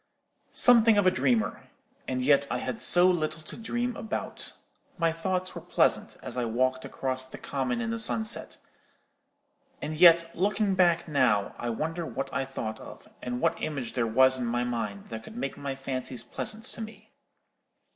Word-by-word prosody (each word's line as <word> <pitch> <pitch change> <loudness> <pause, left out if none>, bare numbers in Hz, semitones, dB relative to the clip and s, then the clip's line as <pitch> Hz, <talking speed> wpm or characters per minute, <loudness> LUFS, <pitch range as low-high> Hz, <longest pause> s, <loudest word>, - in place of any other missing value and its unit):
"Something 230 -3 +6
of 205 - +3
a 185 - +6
dreamer: 120 - 0 0.4
and 130 -1 -1
yet 140 0 +4
I - - -1
had 225 - -4
so 175 0 +6
little 160 -3 +1
to - - -8
dream 240 +2 -2
about. 220 - -4 0.4
My 165 -1 +2
thoughts 185 +3 -2
were - - -7
pleasant, - - +1
as 125 - -7
I 125 - 0
walked 130 +3 0
across 130 -1 -3
the - - -10
common 135 - -2
in 230 -1 -2
the 230 - -2
sunset; 220 0 -1 1.2
and 155 - -4
yet, 165 0 +6
looking 205 +2 +1
back 175 -2 +3
now, 125 -9 +2
I 120 - -3
wonder 160 +9 -3
what 135 -4 -5
I 135 -1 -1
thought 110 -5 -5
of, - - -12
and 125 0 -4
what 165 0 +1
image 140 -6 -4
there 120 -2 0
was 130 +3 +4
in 120 - -2
my 120 +1 0
mind 110 -5 -4
that 110 -1 -6
could 220 - -11
make 140 - -3
my 140 -1 -4
fancies 130 -3 -4
pleasant 215 - -3
to - - -5
me. 220 0 -10
140 Hz, 175 wpm, -28 LUFS, 125-185 Hz, 1.2 s, Something